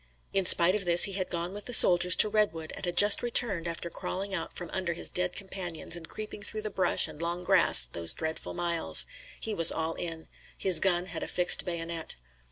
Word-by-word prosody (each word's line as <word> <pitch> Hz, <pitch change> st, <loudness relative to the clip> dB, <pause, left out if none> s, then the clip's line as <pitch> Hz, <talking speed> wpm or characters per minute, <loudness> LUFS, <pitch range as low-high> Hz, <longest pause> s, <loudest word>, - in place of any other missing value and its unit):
In 195 Hz, -1 st, -1 dB
spite 175 Hz, 0 st, +7 dB
of 205 Hz, -2 st, -3 dB
this 175 Hz, 0 st, +5 dB
he 200 Hz, -, +1 dB
had 185 Hz, -1 st, -4 dB
gone 170 Hz, +2 st, -6 dB
with 205 Hz, 0 st, -10 dB
the 245 Hz, -, +2 dB
soldiers 180 Hz, -2 st, +6 dB
to -, -, +4 dB
Redwood 200 Hz, -7 st, -3 dB
and -, -, -8 dB
had 175 Hz, -, -6 dB
just 205 Hz, 0 st, +6 dB
returned 230 Hz, -8 st, -1 dB
after 170 Hz, 0 st, -6 dB
crawling 195 Hz, +3 st, -7 dB
out 165 Hz, -3 st, -5 dB
from 175 Hz, -2 st, -8 dB
under 185 Hz, -3 st, -4 dB
his 165 Hz, -, -7 dB
dead 180 Hz, 0 st, -3 dB
companions 180 Hz, -4 st, -4 dB
and 165 Hz, -2 st, -11 dB
creeping 215 Hz, -1 st, -8 dB
through 215 Hz, +1 st, -7 dB
the 215 Hz, -, -5 dB
brush 190 Hz, -, +1 dB
and 150 Hz, -, -13 dB
long 170 Hz, +1 st, -5 dB
grass 120 Hz, -, +3 dB
those 85 Hz, +7 st, -1 dB
dreadful 160 Hz, 0 st, -7 dB
miles. 165 Hz, -, +2 dB, 0.3 s
He 220 Hz, -, -5 dB
was 165 Hz, -4 st, +7 dB
all 160 Hz, 0 st, -4 dB
in. 165 Hz, -1 st, -8 dB, 0.3 s
His 185 Hz, -4 st, +3 dB
gun 180 Hz, -1 st, -1 dB
had -, -, -9 dB
a -, -, -6 dB
fixed 180 Hz, 0 st, +2 dB
bayonet. 165 Hz, -2 st, -6 dB
175 Hz, 215 wpm, -26 LUFS, 165-195 Hz, 0.3 s, spite